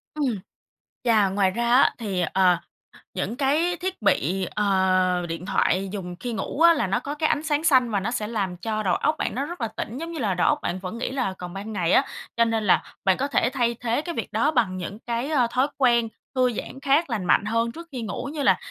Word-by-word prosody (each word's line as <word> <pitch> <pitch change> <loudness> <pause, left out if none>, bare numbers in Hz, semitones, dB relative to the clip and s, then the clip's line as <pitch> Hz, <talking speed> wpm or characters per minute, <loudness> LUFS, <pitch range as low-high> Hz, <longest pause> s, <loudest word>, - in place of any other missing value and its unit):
Ừm. 265 -9 -1 0.6
Chà, 220 -5 +4
ngoài 190 -1 +2
ra 235 +4 -1
á, 270 - +5
thì, 195 -6 -2
ờ, 185 -2 +4 0.6
những 230 - -3
cái 305 +6 +1
thiết 370 -1 -4
bị, 190 -2 +1
ờ, 185 -3 +2
điện 165 +2 -5
thoại 190 +1 +1
dùng 180 -3 -5
khi 245 -1 -4
ngủ 220 +8 -4
á, 335 0 +8
là 290 -10 0
nó 195 +5 +1
có 285 +4 -5
cái 310 +1 +1
ánh 295 - 0
sáng 305 -1 0
xanh 260 -7 +4
và 205 - +1
nó 205 +5 -2
sẽ 220 -4 -2
làm 200 -5 -2
cho 215 +4 -2
đầu 190 - +2
óc 305 - +1
bạn - - -2
nó 275 +3 -1
rất 340 -2 -7
là 230 - 0
tỉnh, 225 +2 -6
giống 330 +3 -5
như 330 - -5
là 210 -6 0
đầu 180 - +1
óc - - +2
bạn 185 - -2
vẫn 185 +4 -6
nghĩ 245 - -3
là 250 -8 -1
còn 180 -1 -7
ban 205 +3 -6
ngày 180 -4 0
á. - - +5 0.3
Cho 230 - +5
nên 225 -1 0
là - - +4 0.2
bạn 190 -1 +4
có 275 - -1
thể 260 -4 +1
thay 240 -3 +1
thế 235 +3 0
cái 340 +1 -5
việc - - -4
đó 300 - +2
bằng 220 -10 +1
những 185 +4 -6
cái, 235 +4 -3
ơ, 265 -6 +3
thói 255 +3 +2
quen 235 -4 +3 0.3
thư 255 -1 +2
giãn 265 - -6
khác 285 +3 +2
lành 215 -6 -2
mạnh 190 - +3
hơn 230 +2 0
trước 335 +6 -10
khi 255 -3 -5
ngủ 230 +4 -4
như 295 -2 -2
là - - +5
230 Hz, 250 wpm, -24 LUFS, 195-275 Hz, 0.6 s, á